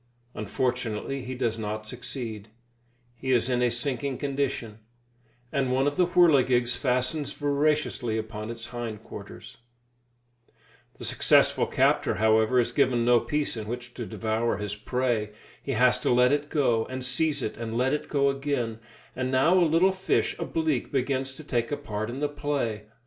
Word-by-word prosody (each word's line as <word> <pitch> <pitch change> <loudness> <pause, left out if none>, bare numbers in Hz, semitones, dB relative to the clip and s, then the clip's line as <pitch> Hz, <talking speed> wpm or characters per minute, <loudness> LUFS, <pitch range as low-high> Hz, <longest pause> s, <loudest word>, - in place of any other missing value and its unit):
Unfortunately 125 +3 -2
he 130 +1 -6
does 115 -3 -1
not 110 0 -4
succeed; 115 -3 -6 0.7
he 130 +2 -3
is 125 0 +2
in 125 0 +1
a 125 - +3
sinking 130 +2 -2
condition, 135 -6 -2 0.7
and 135 -3 0
one 130 +1 +2
of 145 0 0
the 180 +1 +3
whirligigs 130 -9 +4
fastens 130 +2 0
voraciously 145 -5 0
upon 110 0 -5
his 115 0 -6
hind 115 -3 -5
quarters. - - -10 1.4
The - - -6
successful - - +3
captor, - - +2
however, 110 +3 +3
is 120 - +1
given 125 -4 +2
no 120 0 +5
peace 150 +3 -2
in 110 -2 -6
which 120 +1 -6
to 120 -3 -6
devour 110 +2 -1
his 105 0 -4
prey. 115 -1 -1 0.3
He 135 - -3
has 125 +1 +4
to - - -1
let 125 +1 +5
it 145 +1 0
go, 120 -7 +2
and 130 0 -5
seize 150 +4 +1
it, - - -3
and 115 0 -4
let 130 +3 +2
it 150 - -3
go 140 -1 +2
again; 135 -5 -2 0.4
and 130 0 -2
now 135 +6 +4
a 185 - +5
little 170 +5 +4
fish 190 0 0
a - - -2
bleak 160 -6 -1
begins 135 0 -1
to 155 - -11
take 120 -4 -1
a 145 - 0
part 110 -5 -4
in 130 +4 -5
the 150 - +2
play. 145 -7 -2
125 Hz, 170 wpm, -27 LUFS, 115-140 Hz, 1.4 s, no